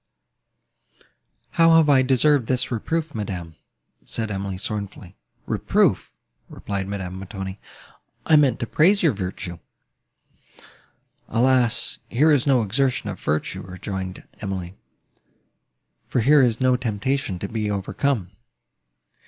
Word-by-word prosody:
"How 165 0 +5
have 160 -2 +5
I 140 -3 +5
deserved 130 0 +3
this 130 0 0
reproof, 155 +7 -2
madam?" 95 -6 -5 0.5
said 110 -2 -3
Emily 95 -1 -4
sorrowfully. 100 -2 -6 0.3
"Reproof!" - - +1 0.4
replied 100 -1 -4
Madame 95 -2 -5
Montoni: 95 0 -7 0.7
"I 160 - +5
meant 140 -6 +4
to - - 0
praise 180 - +3
your 165 - +5
virtue." 90 -3 -5 1.7
"Alas! 125 0 +2
here 150 +6 +3
is 145 -2 +2
no 130 -4 +4
exertion 125 0 0
of 95 - -9
virtue," 75 +1 -2
rejoined 95 0 -6
Emily, 95 -3 -5 1.3
"for 125 - 0
here 145 +5 +5
is 120 -3 +2
no 130 -1 +3
temptation 125 -2 -2
to 100 - -4
be 105 0 -2
overcome." 100 +1 -1
110 Hz, 115 wpm, -23 LUFS, 95-135 Hz, 1.7 s, How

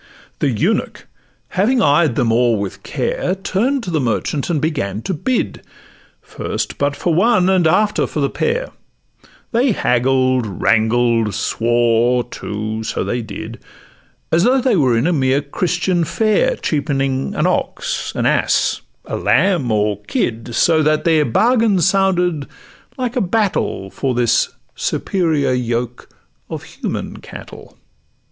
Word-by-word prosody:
The - - +1
eunuch, - - -1 0.4
having 225 +7 +1
eyed 150 -3 +3
them 120 -5 +1
o'er 120 -1 +3
with 100 -1 -5
care, 185 - -2
Turn'd 235 +8 -1
to 180 - -4
the 160 - +1
merchant, 130 +5 -1
and 165 -3 +1
begun 125 - -2
to 190 - -2
bid 245 - -2 0.6
First - - -4
but 145 0 0
for 170 +4 -1
one, 190 +1 +3
and 180 -4 +3
after 210 +6 +2
for - - -4
the 140 - +2
pair; 480 +2 -1 0.8
They 245 +1 +2
haggled, 130 - +1
wrangled, 110 +1 +1
swore, 120 +1 +1
too—so 110 -1 -4
they 120 - -2
did! 110 +1 -8 0.7
As 165 +2 +3
though 255 +4 +4
they 255 -3 +2
were 130 -8 +3
in 115 - +1
a 175 - +2
mere 135 -2 +2
Christian 175 +4 -1
fair 215 - +1
Cheapening 135 - -1
an - - +1
ox, - - -1
an - - -1
ass, - - +1 0.2
a - - -4
lamb, 140 - +2
or 105 -1 0
kid; 115 +2 -2
So 160 +4 +3
that 155 0 +2
their 160 -3 +3
bargain 220 - +3
sounded 180 -5 +1 0.5
like 250 -1 -2
a 250 - +1
battle 190 - -1
For 130 -3 -2
this 120 -1 +2 0.2
superior 160 -8 0
yoke 120 -1 -3 0.4
of - - -6
human - - -5
cattle. - - -12
145 Hz, 140 wpm, -18 LUFS, 120-185 Hz, 0.8 s, though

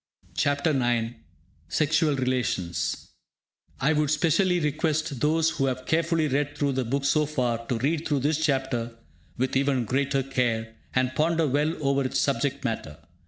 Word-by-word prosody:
CHAPTER 145 +2 +1
IX 120 -4 +1 0.6
SEXUAL 150 - +2
RELATIONS 125 -10 -1 0.7
I 150 +4 +2
would 150 -1 +1
specially 175 +4 +2
request 155 -2 -1
those 160 +3 +2
who 135 -5 0
have 130 0 -3
carefully 165 -1 +1
read 145 +1 -1
through 145 -1 +1
the 130 -1 -1
book 140 +4 -1
so 150 +2 +3
far 120 -6 -1
to 125 - 0
read 150 +6 0
through 145 -3 0
this 155 +3 +1
chapter 130 -5 -1 0.4
with 130 +2 -1
even 135 -2 +2
greater 135 +3 0
care, 115 -4 -1 0.2
and 130 0 +1
ponder 165 +3 +2
well 150 +4 +1
over 140 0 +2
its 130 - -1
subject 140 0 0
matter. 110 -10 -3
140 Hz, 155 wpm, -26 LUFS, 130-155 Hz, 0.7 s, so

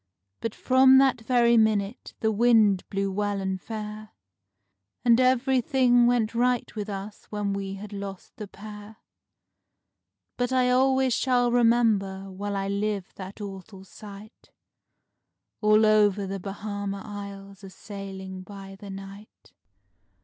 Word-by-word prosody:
But 230 - -4
from 260 +1 +5
that 265 -3 +3
very 235 0 +3
minute 215 0 0
the 220 - +2
wind 215 -3 +4
blew 195 0 -2
well 205 0 -1
and 190 -1 -3
fair, 215 0 -7 1.0
And 235 0 +5
everything 255 -1 +3
went 235 -2 +1
right 245 0 0
with 210 -1 -4
us 200 +1 -7
when 205 -1 -2
we 195 0 -4
had 205 +1 -9
lost 195 -1 -8
the 210 - -7
pair; 210 +1 -11 1.4
But 245 0 -1
I 255 -1 +2
always 260 0 +3
shall 245 -1 +2
remember 220 -5 +2
while 200 +2 -4
I 195 0 -2
live 200 -1 -2
that 195 +2 -9
awful 195 0 -9
sight, 205 +2 -13 1.1
All 215 0 +5
over 210 -2 +3
the 195 +1 -5
Bahama 200 0 -5
Isles 200 -1 -9
a 195 - -9
sailing 190 -1 -8
by 195 0 -11
the 200 0 -11
night. 195 +2 -11
210 Hz, 130 wpm, -26 LUFS, 195-235 Hz, 1.4 s, from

